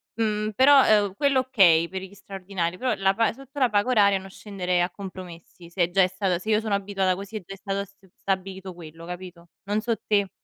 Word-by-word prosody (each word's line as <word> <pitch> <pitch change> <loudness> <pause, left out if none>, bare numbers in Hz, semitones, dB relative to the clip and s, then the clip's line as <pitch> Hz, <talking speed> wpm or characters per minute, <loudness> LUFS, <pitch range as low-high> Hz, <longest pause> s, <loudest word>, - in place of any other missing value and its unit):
mhmm, 215 -1 -1
però, 260 -6 +6
uhm, 195 - -6
quello 280 +1 +2
okay, 180 -10 +4
per 190 +1 -6
gli 190 +1 -10
straordinari, 190 -3 -4
però 255 -2 0
la 195 0 +2
pa 225 +3 +1
sotto 275 +3 -11
la 255 -3 +3
paga 205 +4 +1
oraria 200 -4 +4
non 190 - -11
scenderei 185 -3 -2
a 175 - +1
compromessi 180 -3 -11
se 175 -1 0
già 195 +2 +3
è - - +3
stata 185 -1 -1
se 215 - -7
io 215 -1 +3
sono 220 -2 -2
abituata 195 -1 0
così 200 +3 -9
e - - -4
già 195 - -8
è - - -11
stato 200 0 -3
st 200 0 -24
stabilito 190 -1 -4
quello, 165 -1 -12
capito? 175 -1 -9 0.2
Non 210 +2 -1
so 230 0 -1
te. 200 -2 +2
195 Hz, 225 wpm, -25 LUFS, 180-215 Hz, 0.2 s, però